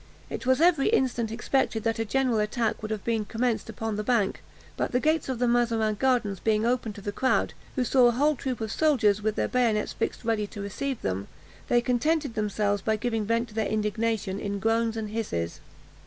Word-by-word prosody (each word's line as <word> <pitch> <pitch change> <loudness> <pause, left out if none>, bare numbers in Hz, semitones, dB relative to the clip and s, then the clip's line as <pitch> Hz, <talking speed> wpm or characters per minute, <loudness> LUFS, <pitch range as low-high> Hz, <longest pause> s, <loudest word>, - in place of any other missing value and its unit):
It - - -5
was 260 +1 +4
every 330 -4 +4
instant 245 - +1
expected 230 -1 0
that 225 0 0
a 225 - 0
general 250 0 +1
attack 220 +1 -1
would 215 - -5
have 215 -2 -3
been 225 -2 0
commenced 230 +2 -1
upon 220 -1 -3
the 210 - -2
bank; 215 -4 +1 0.3
but - - -2
the 250 - +3
gates 310 0 +1
of 260 - -1
the 245 +1 +1
Mazarin 230 -2 +2
Gardens 220 -5 +1
being 215 +1 +1
opened 235 -3 0
to 205 - -9
the 205 - -3
crowd, 260 +5 +1 0.2
who 255 - +1
saw 250 +1 +5
a - - +4
whole 295 +5 +2
troop 255 -2 -4
of 220 -2 -3
soldiers, 220 -10 +3
with 215 0 0
their - - 0
bayonets 230 -4 +1
fixed - - -3
ready 220 -2 0
to 205 - -10
receive 230 +6 -4
them, 95 +1 -2 0.4
they 240 - +3
contented 280 +3 0
themselves 205 -1 0
by 220 +2 +1
giving 225 -1 -1
vent 230 +2 0
to - - -14
their 220 -1 0
indignation 215 -2 -1
in 200 0 -3
groans 225 +2 +1
and 215 -2 -4
hisses. 85 - -3
225 Hz, 210 wpm, -27 LUFS, 210-250 Hz, 0.4 s, saw